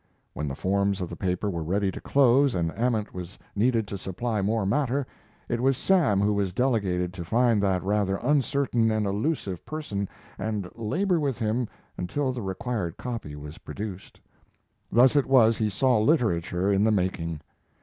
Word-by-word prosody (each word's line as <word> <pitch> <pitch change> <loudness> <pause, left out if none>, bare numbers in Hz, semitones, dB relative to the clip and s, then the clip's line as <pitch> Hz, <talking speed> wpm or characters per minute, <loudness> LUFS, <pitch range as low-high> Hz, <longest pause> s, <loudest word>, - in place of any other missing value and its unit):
When 75 - -3
the 70 - -3
forms 100 +3 0
of 90 -2 -3
the - - -5
paper 90 +2 -1
were 85 -4 -2
ready 95 +5 0
to - - -8
close 135 0 +4
and 85 -2 0
Ament 115 -3 0
was 90 +1 -7 0.2
needed 115 0 +2
to 100 - -5
supply 105 +4 -2
more 105 +1 0
matter, 135 +5 +1 0.4
it 120 - -1
was 135 0 +3
Sam 160 - +3
who 105 +1 +2
was 100 -2 0
delegated 95 -7 0
to 90 -2 -6
find 115 +3 +2
that 95 -2 +1
rather 100 -1 +1
uncertain 135 -2 +1
and 110 -1 0
elusive 100 - -2
person 105 -11 -4 0.3
and 105 -4 -2
labor 170 - 0
with 140 -5 -1
him 115 +2 0 0.3
until 130 +10 -1
the 125 - -5
required 95 -2 -3
copy 115 -12 -5
was 75 +2 -9
produced. 100 -3 -7 0.7
Thus 125 +4 +5
it 145 - +3
was 115 -4 +5
he 110 -1 +1
saw 125 +3 +2
literature 100 - +2
in 100 +1 +3
the 110 - +4
making. 90 -6 -1
105 Hz, 170 wpm, -26 LUFS, 95-125 Hz, 0.7 s, Thus